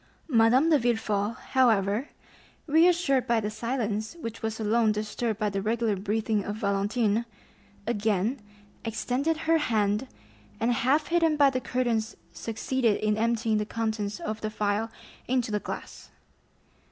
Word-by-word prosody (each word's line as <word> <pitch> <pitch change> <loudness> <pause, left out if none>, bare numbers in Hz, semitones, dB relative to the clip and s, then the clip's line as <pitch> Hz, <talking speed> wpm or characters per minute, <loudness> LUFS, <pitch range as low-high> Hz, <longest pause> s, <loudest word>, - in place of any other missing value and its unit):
Madame 245 +7 +5
de 300 - +5
Villefort, 220 -3 0 0.2
however, 225 -1 +2 0.6
reassured 325 -4 +3
by 235 -1 +3
the 210 -1 -3
silence, 220 +1 -2
which 230 -6 -6
was 220 0 -3
alone 220 +1 +2
disturbed 215 +1 -2
by 215 - +1
the 200 -1 -2
regular 225 0 0
breathing 210 +1 -1
of 205 - -4
Valentine, 205 +2 0 0.6
again 220 +2 0 0.4
extended 250 +8 -1
her 325 0 +4
hand, 215 -2 +1 0.5
and 235 +2 +2
half 280 +6 +1
hidden 330 -3 +3
by 285 -2 +5
the 255 -1 -2
curtains 235 -4 -1 0.2
succeeded 230 0 0
in 215 0 +1
emptying 225 0 +1
the - - 0
contents 220 -2 -2
of 215 0 -4
the 215 - -2
phial 210 +1 -1 0.4
into 245 -3 0
the 210 - 0
glass. - - -8
225 Hz, 140 wpm, -27 LUFS, 210-250 Hz, 0.6 s, Madame